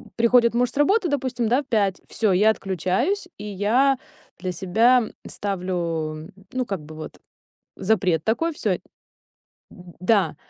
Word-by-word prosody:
приходит 235 0 +4
муж 245 +1 +2
с - - -12
работы, 375 +7 +3
допустим, 255 -5 -1
в 260 +4 +2
5, 200 -5 +1
всё, 215 -4 0
я 210 +4 +5
отключаюсь, 195 - -1
и 210 - -7
я 225 +7 +2 0.4
для 185 0 -3
себя 225 +8 +3 0.2
ставлю, 170 -5 -3 0.2
ну, 255 -1 -1
как 195 -6 -3
бы 155 +1 -11
вот 155 0 -9 0.6
запрет 185 -6 +1
такой, 325 +9 0
всё. - - -1 0.9
Да 180 0 -1
210 Hz, 130 wpm, -23 LUFS, 180-250 Hz, 0.9 s, я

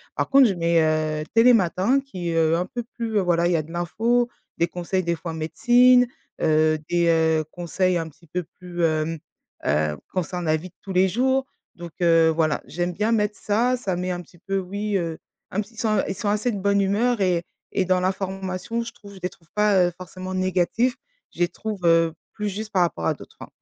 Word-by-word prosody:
Par - - 0
contre 275 -2 +7
je - - 0
mets, 170 -1 +2
heu, 155 -1 0
Télématin 230 0 +4
qui 185 -11 -5
est 165 - -1 0.2
un 175 +2 0
peu 240 - -5
plus, 230 -2 -3
heu, - - +4
voilà 175 -2 +2
il 175 - +1
y - - +3
a - - 0
de 160 - -13
l'info, 230 +8 +1 0.3
des 170 - +2
conseils 180 +2 -2
des 170 0 0
fois 165 0 -6
médecine, 245 +10 +4 0.3
heu, 155 0 +3
des, 175 -1 +2
heu, 160 -1 +3
conseils 180 +1 0
un 165 -1 -3
petit 170 +3 -22
peu 180 +4 -3 0.2
plus, 175 -1 -4
hem, 155 0 0 0.5
heu, 75 +1 +1 0.2
concernant 180 -1 -2
la 155 0 +3
vie 165 +4 -8
de - - -35
tous 195 - -6
les 185 +1 +4
jours. 260 +5 +1 0.3
Donc 170 -1 -9
heu, 165 -1 +5
voilà. 160 -1 +1
J'aime 175 +1 -2
bien 210 +5 0
mettre 210 -1 0
ça, 240 +5 +1
ça 195 -7 -2
met 180 +1 -2
un 175 - -3
petit 175 0 -19
peu 195 +2 -2
oui, 200 +2 -2
heu, 165 -3 -3 0.3
un 200 - 0
petit 220 +2 -12
ils - - -10
sont 215 -2 +1
ils 195 - -3
sont 215 - -4
assez 210 +4 +1
de 205 - -4
bonne 200 +1 +2
humeur 215 +4 +1
et 180 -3 +2 0.3
et 190 - +1
dans 185 0 +2
l'information 190 +4 -2
je 230 - -7
trouve 200 -2 -14
je - - -11
les 180 - 0
trouve 165 - -23
pas, 210 -3 +4
heu, - - -2
forcément 185 +1 -7
négatifs. 185 +7 +1 0.4
Je - - -15
les 175 - +4
trouve, 210 +3 -5
heu, 165 -1 +4 0.2
plus 210 -1 -3
juste 215 +2 -6
par 185 - +3
rapport 85 - -2
à - - +2
d'autres, - - -14
hein. - - -7
185 Hz, 225 wpm, -24 LUFS, 170-210 Hz, 0.5 s, contre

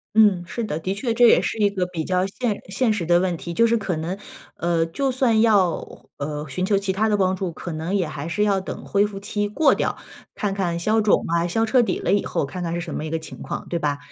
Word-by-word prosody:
嗯， 205 -5 +5
是 235 +7 -4
的， 155 -8 -2
的 185 +4 -2
确 230 +4 -2
这 240 +1 +6
也 235 - +6
是 - - -2
一 205 -2 +3
个 185 -3 -1
比 170 -3 -4
较 185 +2 +1
现 210 +1 -2
现 220 +3 +1
实 205 -5 -2
的 175 +1 +4
问 180 -1 0
题。 170 +1 -6
就 230 +7 +3
是 230 0 +3
可 200 -5 -2
能， 165 +4 -3 0.4
呃， 170 -1 +1
就 265 +12 -1
算 245 -4 +3
要， 200 -7 +1
呃， 150 +1 -4
寻 180 +7 -3
求 200 +2 +2
其 195 -1 -1
他 215 +3 +1
的 210 - +2
帮 190 -1 +2
助， 185 -2 -3
可 170 +1 -7
能 160 +5 -2
也 185 -5 +1
还 150 0 -6
是 210 +5 0
要 200 -2 +2
等 - - -7
恢 200 +1 +2
复 200 -1 -8
期 205 +1 -2
过 210 +10 +3
掉， - - -1 0.4
看 205 -2 -1
看 180 -4 -1
消 215 +6 +2
肿 210 -1 +3
啊， 170 +1 +1
消 225 +6 +1
彻 250 +3 +4
底 235 - 0
了 - - -1
以 205 - +2
后， - - -1
看 180 +7 -6
看 170 -1 -2
是 - - -2
什 - - -6
么 155 - -3
一 - - -4
个 165 - -1
情 160 - -10
况， - - -5
对 170 - -1
吧？ 145 -2 0
190 Hz, 290 characters per minute, -23 LUFS, 170-210 Hz, 0.4 s, 这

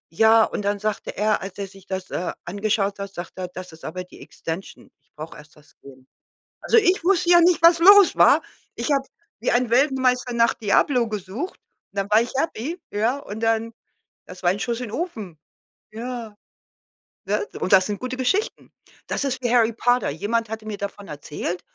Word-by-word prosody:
ja 225 +3 +6
und - - -4
dann 205 0 0
sagte 215 0 -4
er, 210 +1 +1
als 195 0 -8
er 200 - -3
sich 195 0 -17
das, 190 -1 -5
äh, 180 - -3
angeschaut 200 +2 -1
hat, 200 0 -5
sagte 175 -1 -7
er: - - -3
„Das 180 0 -9
ist 160 - -15
aber 180 +3 -5
die - - -16
Extension. 165 +4 -8
Ich - - -43
brauch 155 +2 -8
erst 150 0 -15
das 145 -1 -22
Game“. 130 -1 -15 0.6
Also 465 - +4
ich 370 -5 +2
wusste 360 -1 +2
ja 345 -1 +8
nicht, 345 0 +4
was 335 0 +7
los 400 +2 +7
war. - - +6 0.3
Ich - - -3
habe 275 -1 +1 0.3
wie - - 0
ein 245 0 +2
Weltmeister 255 -1 +2
nach 230 -1 +3
„Diablo“ 235 +3 +2
gesucht 210 - -5 0.3
und 200 - -8
dann 195 0 -1
war 215 +2 +5
ich 240 - -5
happy, 320 +3 -3
ja, 225 +6 0
und 220 -6 -8
dann 225 0 0 0.5
das 180 - -12
war 175 - +4
ein 195 - -4
Schuss 235 +3 -2
in 235 -4 -6
Ofen. 220 - -5 0.5
Ja, 230 -1 -6 0.9
ne? - - -1
Und - - 0
das 185 -1 +6
sind 205 -1 -4
gute 255 0 -4
Geschichten. 380 - -1 0.4
Das - - -1
ist 265 -1 -2
wie 240 - 0
Harry 230 -2 +4
Potter. 245 +2 +1
Jemand 210 +8 -2
hatte 220 0 -6
mir 210 -2 -4
davon 200 0 -6
erzählt 150 +4 -5
220 Hz, 195 wpm, -23 LUFS, 195-255 Hz, 0.9 s, ja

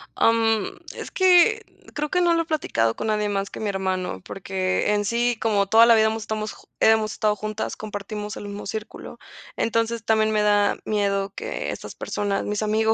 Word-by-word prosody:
Am, 225 -2 +2 0.2
es - - -7
que, 375 +4 +4 0.3
creo 300 0 -2
que 360 - +1
no 345 -1 +4
lo 330 - +1
he - - -17
platicado 115 - 0
con - - -4
nadie 210 -1 0
más 195 -1 -2
que - - -9
mi 215 - -2
hermano, 185 - -2
porque 190 +1 -1
en 205 0 0
sí, 235 +2 +1
como 205 -3 +2
toda 225 +3 +6
la 230 - +7
vida 220 0 +4
hemos 220 0 -1
estamos 215 0 -4 0.2
hemos 220 -1 +3
estado 210 -1 +1
juntas, 215 +1 -4
compartimos 210 0 -6
el - - -7
mismo 200 0 -7
círculo. 215 +2 -7 0.4
Entonces 230 0 0
también 220 -1 +2
me 215 -1 +2
da 205 -1 +3
miedo, 200 -2 0
que - - -4
estas - - -8
personas, 205 -1 -2
mis 210 0 -2
amigos. 220 +1 +2
215 Hz, 190 wpm, -23 LUFS, 205-225 Hz, 0.4 s, la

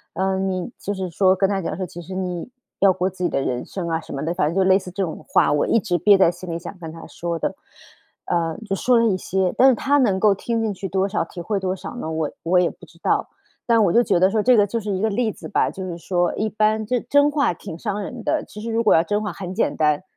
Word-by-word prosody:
呃， 190 +1 0
你 190 +1 -2
就 205 - -3
是 190 -2 -4
说 185 +2 +3
跟 195 0 +2
她 195 -1 0
讲 - - -3
说， 185 - -2
其 175 -1 -9
实 185 +3 -9
你 180 +1 -4 0.3
要 195 -1 +6
过 180 +1 0
自 185 -1 -7
己 175 - +2
的 - - 0
人 125 -2 -2
生 180 -3 -5
啊 165 0 -1
什 - - -12
么 135 - -4
的， 165 +2 -1
反 175 - +1
正 155 - -2
就 195 - +3
类 190 0 +6
似 185 - -9
这 195 +2 -2
种 165 - -5
话， - - +4
我 145 - +2
一 230 - +3
直 185 -4 -1
憋 200 +4 +5
在 190 - +5
心 175 +1 -10
里 165 - -3
想 180 +3 -9
跟 165 -2 -7
她 165 0 -10
说 170 -1 -4
的。 - - -2 0.7
呃， 165 -2 -1
就 195 - 0
说 245 +5 +3
了 230 - +3
一 200 - +2
些， 185 0 -1
但 265 - +7
是 260 - +4
她 285 +5 +2
能 205 -8 +2
够 205 0 +4
听 230 +3 -2
进 215 -2 -1
去 195 +1 -5
多 190 +2 +1
少 200 -2 -1
体 175 - -10
会 200 +4 -1
多 185 -1 -1
少 190 - -8
呢？ 160 - -4
我 160 -2 -2
我 180 +2 +3
也 180 - +2
不 - - -14
知 - - -21
道， - - +1 0.4
但 230 -2 +4
我 175 - +2
就 240 - +5
觉 195 -6 +2
得 185 +2 +5
说 215 0 +1
这 250 +1 +5
个 205 -1 +4
就 230 +4 -2
是 210 0 -3
一 190 -1 -1
个 220 - +2
例 220 +2 0
子 - - -10
吧， - - +2
就 190 -1 -6
是 175 -2 -5
说 175 0 0
一 215 - -1
般 215 +1 +1
就 250 +4 0
是 - - -5
真 285 +1 +4
话 285 -10 +1
挺 165 -1 -9
伤 210 0 -3
人 235 +4 -6
的， - - 0
其 210 - -11
实 230 - -5
如 230 +1 +1
果 215 - +5
要 165 - +4
真 205 +5 -1
话 210 -2 -3
很 185 0 -6
简 225 - 0
单， 150 +1 +2
190 Hz, 320 characters per minute, -22 LUFS, 175-215 Hz, 0.7 s, 但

